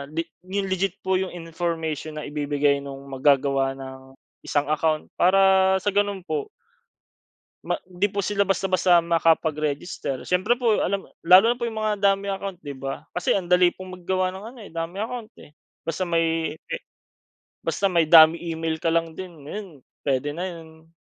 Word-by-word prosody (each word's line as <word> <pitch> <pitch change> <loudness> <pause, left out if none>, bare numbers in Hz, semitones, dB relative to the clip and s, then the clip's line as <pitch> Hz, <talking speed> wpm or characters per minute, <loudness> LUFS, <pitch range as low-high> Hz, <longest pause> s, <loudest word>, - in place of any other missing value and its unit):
li 165 - 0 0.2
yung 195 +1 -2
legit 190 0 0
po 190 0 +2
yung 190 -1 -3
information 165 -2 -4
na 150 - -5
ibibigay 145 -1 +1
nung 140 -1 -8
mag-gagawa 135 0 +2
ng 130 0 -10 0.3
isang 145 0 0
account 155 0 0
para 190 +1 +5
sa 205 - +1
ganun 205 -1 0
po 155 -5 -3 1.2
ma - - -2
'di 185 +3 0
po 200 - -3
sila 200 -1 +2
basta-basta 185 -2 +3
makapag-register. 160 -4 0
Siyempre 185 +7 +2
po 230 -4 +2
alam 195 +1 -2 0.2
lalo 185 +4 +8
na - - -14
po 240 - -6
iyong 220 -1 -5
mga 215 -1 0
dummy 200 0 +2
account 195 -2 -6
'di 145 -4 -7
ba? 135 +3 -6
Kasi 180 - 0
ang 180 -2 -4
dali 180 0 +5
pong 185 0 -9
mag-gawa 185 +1 -1
ng 190 - -9
ano 245 - -13
eh - - -13
dummy 165 +4 -4
account 225 0 -5
eh. - - -15 0.3
Basta 165 +3 -2
may 165 -2 0
e 170 - -6 0.9
basta 200 - -1
may 170 -3 +3
dummy 160 0 +8
email 160 0 -2
ka 165 - +1
lang 165 0 0
din 170 -4 -9
ngayon, 205 +7 -6 0.4
pwede 135 +1 +1
na 175 - -4
iyon. 160 -1 -13
170 Hz, 170 wpm, -24 LUFS, 155-190 Hz, 1.2 s, lalo